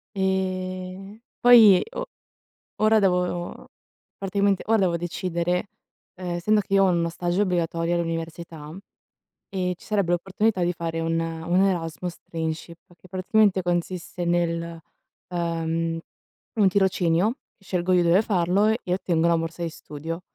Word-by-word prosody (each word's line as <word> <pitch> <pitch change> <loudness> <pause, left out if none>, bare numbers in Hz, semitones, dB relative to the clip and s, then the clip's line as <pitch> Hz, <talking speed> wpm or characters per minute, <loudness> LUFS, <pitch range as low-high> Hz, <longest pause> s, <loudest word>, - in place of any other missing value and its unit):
Ehm, 190 +1 -2 0.2
poi 225 -6 +8
o - - -4 0.7
ora 215 +1 +4
devo 180 -3 -1 0.5
praticamente, 200 0 +1
ora 225 +1 +3
devo 180 -3 +2
decidere, 175 +1 -2 0.5
ehm, 180 -2 -4
essendo 210 +5 +2
che 200 0 -3
io 195 0 +6
ho - - +4
uno 170 -1 +1
stage 175 +2 -1
obbligatorio 170 -2 0
all'università 165 -2 -4 0.7
e 180 -2 -2
ci - - -18
sarebbe 200 -5 0
l'opportunità 195 +3 0
di 175 0 +1
fare 165 -1 -4
un 165 0 0
un 165 +2 0
Erasmus 175 -2 -2
Trainship, 165 +1 -5 0.2
che 185 - -18
praticamente 195 +1 +2
consiste 175 0 -2
nel, 170 -1 -1 0.5
uhm, 165 -1 -1 0.6
un 210 -3 +4
tirocinio, 190 - +2 0.2
scelgo 185 -2 -1
io 180 -1 +4
dove 170 +4 +4
farlo 190 0 +2
e 220 +2 +1
ottengo 170 -3 +1
la 170 - +4
morsa 165 +1 -4
di 170 - -1
studio. 160 +2 -7
175 Hz, 135 wpm, -24 LUFS, 170-190 Hz, 0.7 s, poi